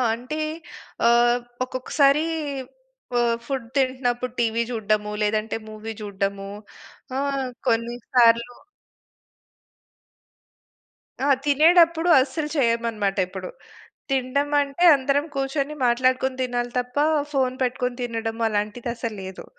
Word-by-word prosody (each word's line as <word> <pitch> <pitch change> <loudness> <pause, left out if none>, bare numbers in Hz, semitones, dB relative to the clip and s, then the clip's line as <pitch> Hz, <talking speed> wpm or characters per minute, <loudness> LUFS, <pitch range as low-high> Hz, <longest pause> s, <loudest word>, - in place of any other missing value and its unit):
అంటే, 255 +6 -6 0.7
ఆహ్, 240 +1 +4 0.2
ఒక్కొక్కసారీ 275 +4 +2 0.9
వ - - -1 0.3
ఫుడ్ 265 -3 -3
తింటన్నప్పుడు 250 -2 0
టీవీ 230 -1 +1
జూడడము, 215 -2 -1
లేదంటే 215 +1 0
మూవీ 215 +1 -7
జూడడము, 195 -1 -3 0.7
ఆహ్, 275 -2 -1 0.2
కొన్నిసార్లు 235 +1 +2 2.7
ఆ! - - +1 0.2
తినేడప్పుడు 330 +3 +5
అస్సలు 300 +3 -1
చెయ్యమనమాటెప్పుడు. 225 - 0 0.6
తిండమంటే 280 +4 +1
అందరం 275 +2 0
కూర్చొని 275 +2 -2
మాట్లాడుకొని 255 +2 +1
తినాలి 245 -1 -2
తప్పా, 250 +4 0 0.3
ఫోన్ 260 -2 +1
పెట్టుకొని 250 0 -1
తినడం 225 -1 -3
అలాంటిదసలు 225 +2 -3
లేదు. 190 0 -8
245 Hz, 85 wpm, -23 LUFS, 225-275 Hz, 2.7 s, తినేడప్పుడు